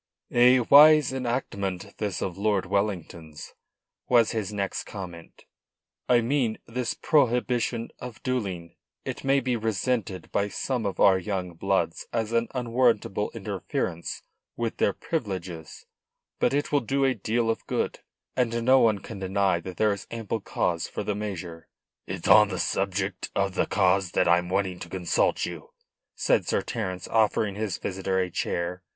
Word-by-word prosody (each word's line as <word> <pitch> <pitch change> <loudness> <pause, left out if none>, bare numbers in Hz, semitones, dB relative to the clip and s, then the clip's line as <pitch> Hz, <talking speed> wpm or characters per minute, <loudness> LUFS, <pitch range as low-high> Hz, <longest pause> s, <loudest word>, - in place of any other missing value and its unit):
"A 125 +1 +6
wise 150 +2 +7
enactment 100 -7 -3
this 105 -3 -2
of 90 - -3
Lord 100 -1 +1
Wellington's," 85 -6 -3 0.6
was 120 -3 +5
his 110 -3 -2
next 100 -2 -3
comment. 90 -5 -9 0.7
"I 120 -1 +5
mean 120 -2 0
this 125 +1 -3
prohibition 125 -4 +1
of 125 -3 -8
duelling. 95 -10 -3 0.3
It - - -5
may 135 0 +3
be 125 -1 -1
resented 110 -2 -2
by 100 - +1
some 115 +2 -2
of 95 - -5
our 95 -1 +6
young 90 -2 -3
bloods 85 -1 -1
as 115 -1 -1
an 115 0 +1
unwarrantable 120 -4 +1
interference 95 -4 -4 0.3
with 115 -1 -2
their 100 - +2
privileges, 95 - -5 0.5
but 120 - +3
it 145 +1 -1
will 145 - +4
do 135 +3 0
a 130 - +3
deal 115 +1 0
of 115 - -6
good, - - -1 0.4
and 115 -2 0
no 130 +1 +6
one 110 -4 +4
can 110 -1 -8
deny 95 -1 +1
that 90 +2 -8
there 110 -1 +3
is 100 - -8
ample 115 -1 -3
cause - - -1
for - - -5
the 105 - -1
measure." 90 -5 -6 0.4
"It - - -5
is - - 0
on 105 0 +8
the 95 -2 -4
subject 95 +1 -1
of 100 -1 +1
the - - 0
cause 95 -2 +2
that - - +2
I'm 90 +1 +3
wanting 95 -1 -1
to 85 - -8
consult 90 -2 +1
you," - - -8 0.5
said - - +1
Sir - - +1
Terence, 90 -1 -4
offering 110 -2 +2
his 105 -3 -3
visitor 95 0 -2
a 90 -1 0
chair. 85 +2 -2
105 Hz, 160 wpm, -26 LUFS, 95-120 Hz, 0.7 s, on